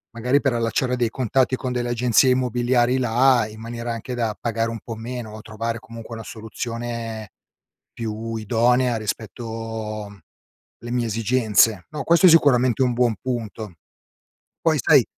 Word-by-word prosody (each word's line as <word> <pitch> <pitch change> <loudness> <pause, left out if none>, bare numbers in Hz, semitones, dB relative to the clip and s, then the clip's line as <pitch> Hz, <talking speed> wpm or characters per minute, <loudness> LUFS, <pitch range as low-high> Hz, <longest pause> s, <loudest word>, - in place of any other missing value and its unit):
magari 125 +5 +2
per 135 - +2
allacciare 120 +2 0
dei 120 -2 +1
contatti 130 +2 +1
con 130 0 -4
delle 120 -1 -2
agenzie 120 +2 +3
immobiliari 125 0 +2
là 125 -1 +3
in 110 0 -12
maniera 115 +1 -4
anche 115 +2 -6
da 115 -3 -2
pagare 115 -1 -1
un 115 - -5
po' 115 - -6
meno 115 -1 -6
o 110 - -9
trovare 115 +1 -4
comunque 115 +1 -9
una 115 - -7
soluzione 115 0 -5 0.6
più 115 0 -4
idonea 120 +3 +2
rispetto 110 -1 -5 0.6
le 120 - -8
mie 120 -1 0
esigenze. 110 -3 +2
No, 150 - -4
questo 170 +3 +4
è - - +9
sicuramente 130 -7 +4
un 125 - +2
buon 120 -2 +2
punto. 110 -5 -4 0.9
Poi - - +2
sai - - +5
115 Hz, 150 wpm, -22 LUFS, 110-125 Hz, 0.9 s, è